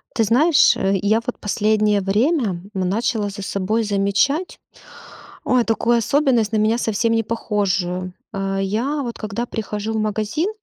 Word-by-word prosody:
Ты 225 Hz, -3 st, +2 dB
знаешь, 285 Hz, +8 st, +4 dB
э, 195 Hz, 0 st, 0 dB
я 215 Hz, +3 st, +2 dB
вот 250 Hz, -, -5 dB
последнее 210 Hz, 0 st, +1 dB
время, 240 Hz, -, +1 dB, 0.3 s
м, 185 Hz, -2 st, -1 dB
начала 215 Hz, 0 st, -1 dB
за 200 Hz, 0 st, -8 dB
собой 200 Hz, +3 st, -1 dB
замечать, 210 Hz, -, 0 dB, 0.8 s
ой, 255 Hz, -1 st, +2 dB
такую 230 Hz, +1 st, +1 dB
особенность, 245 Hz, -3 st, +2 dB
на -, -, +2 dB
меня 215 Hz, +2 st, +2 dB
совсем 230 Hz, 0 st, 0 dB
не 225 Hz, 0 st, +1 dB
похожую. 190 Hz, -5 st, -2 dB, 0.2 s
Э-э, 195 Hz, 0 st, -2 dB
я, 240 Hz, +10 st, -1 dB
вот 240 Hz, -3 st, -5 dB
когда 220 Hz, +2 st, -4 dB
прихожу 215 Hz, -1 st, -4 dB
в -, -, -1 dB
магазин, 215 Hz, -, -1 dB
215 Hz, 155 wpm, -20 LUFS, 200-235 Hz, 0.8 s, знаешь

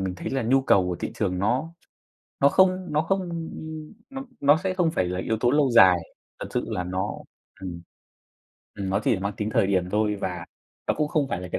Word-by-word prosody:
mình 95 Hz, -1 st, -2 dB
thấy -, -, -5 dB
là 135 Hz, -2 st, -1 dB
nhu 130 Hz, +4 st, +3 dB
cầu 95 Hz, -8 st, +4 dB
của 90 Hz, -, -2 dB
thị -, -, -5 dB
trường 90 Hz, -4 st, -1 dB
nó 125 Hz, -, 0 dB, 0.7 s
nó 140 Hz, -, +6 dB
không 185 Hz, +1 st, +3 dB
nó 150 Hz, -, +3 dB
không 170 Hz, -2 st, -2 dB, 0.6 s
nó 270 Hz, 0 st, -6 dB, 0.2 s
nó 145 Hz, +2 st, +5 dB
sẽ 190 Hz, -1 st, 0 dB
không 175 Hz, -3 st, +1 dB
phải 95 Hz, -, 0 dB
là 90 Hz, +1 st, -3 dB
yếu 110 Hz, +4 st, -1 dB
tố 120 Hz, +1 st, +2 dB
lâu 145 Hz, -2 st, +3 dB
dài. 95 Hz, -6 st, +7 dB, 0.4 s
Thật -, -, -5 dB
sự -, -, -1 dB
là 90 Hz, -, -2 dB
nó, 95 Hz, +1 st, -2 dB, 0.5 s
ừm, 85 Hz, -2 st, -6 dB, 0.9 s
ừm, 95 Hz, -1 st, -4 dB
nó 100 Hz, -, +1 dB
chỉ -, -, +3 dB
là 95 Hz, -, -4 dB
mang 100 Hz, +1 st, -2 dB
tính 105 Hz, 0 st, -2 dB
thời 100 Hz, -, +2 dB
điểm 95 Hz, -2 st, 0 dB
thôi 105 Hz, 0 st, +1 dB
và 90 Hz, -2 st, -3 dB, 0.4 s
nó -, -, +1 dB
cũng 150 Hz, -1 st, 0 dB
không 145 Hz, -3 st, 0 dB
phải 90 Hz, -, -3 dB
là 90 Hz, -, -7 dB
cái -, -, 0 dB
110 Hz, 230 wpm, -25 LUFS, 95-150 Hz, 0.9 s, dài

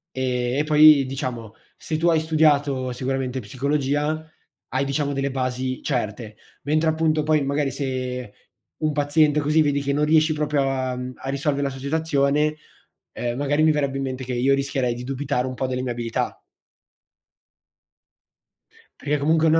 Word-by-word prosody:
E 125 Hz, -1 st, -1 dB
e -, -, +2 dB
poi 150 Hz, -2 st, +7 dB
diciamo, 125 Hz, -5 st, -5 dB, 0.2 s
se 155 Hz, -, -3 dB
tu 170 Hz, +2 st, +2 dB
hai 165 Hz, -1 st, +3 dB
studiato 145 Hz, -5 st, +2 dB
sicuramente 130 Hz, 0 st, -2 dB
psicologia, 145 Hz, +6 st, -1 dB, 0.4 s
hai, 135 Hz, +1 st, 0 dB
diciamo, 140 Hz, +1 st, -1 dB
delle 135 Hz, 0 st, -1 dB
basi 130 Hz, 0 st, -2 dB
certe, 110 Hz, -4 st, -3 dB, 0.3 s
mentre 155 Hz, +2 st, +2 dB
appunto 155 Hz, -1 st, +1 dB
poi 155 Hz, -1 st, +2 dB
magari 140 Hz, 0 st, 0 dB
se 130 Hz, -4 st, -4 dB, 0.5 s
un 155 Hz, -1 st, +1 dB
paziente 150 Hz, +1 st, +3 dB
così 150 Hz, +2 st, +3 dB
vedi 145 Hz, -2 st, +1 dB
che 140 Hz, 0 st, -1 dB
non 150 Hz, +1 st, +2 dB
riesci 155 Hz, +1 st, +4 dB
proprio 150 Hz, -1 st, 0 dB
a, 130 Hz, -1 st, -2 dB
mhmm, 125 Hz, 0 st, -5 dB
a 135 Hz, -, -7 dB
risolvere 140 Hz, +1 st, -1 dB
la -, -, 0 dB
sua 135 Hz, 0 st, -8 dB
situazione, 150 Hz, 0 st, +1 dB, 0.6 s
ehm, 120 Hz, 0 st, -3 dB
magari 145 Hz, +2 st, +1 dB
mi 155 Hz, -, +5 dB
verrebbe 140 Hz, -2 st, -1 dB
in -, -, -2 dB
mente 130 Hz, 0 st, -4 dB
che 125 Hz, -, -4 dB
io 130 Hz, +3 st, +3 dB
rischierei 135 Hz, -3 st, -1 dB
di 120 Hz, +1 st, -7 dB
dubitare 135 Hz, 0 st, -2 dB
un 130 Hz, -, -4 dB
po' 130 Hz, -, -2 dB
delle 125 Hz, 0 st, -2 dB
mie 125 Hz, -1 st, -2 dB
abilità. 115 Hz, -1 st, -3 dB, 2.6 s
Perché 150 Hz, 0 st, 0 dB
comunque 160 Hz, +3 st, +2 dB
non 160 Hz, +1 st, +5 dB
140 Hz, 165 wpm, -23 LUFS, 130-150 Hz, 2.6 s, poi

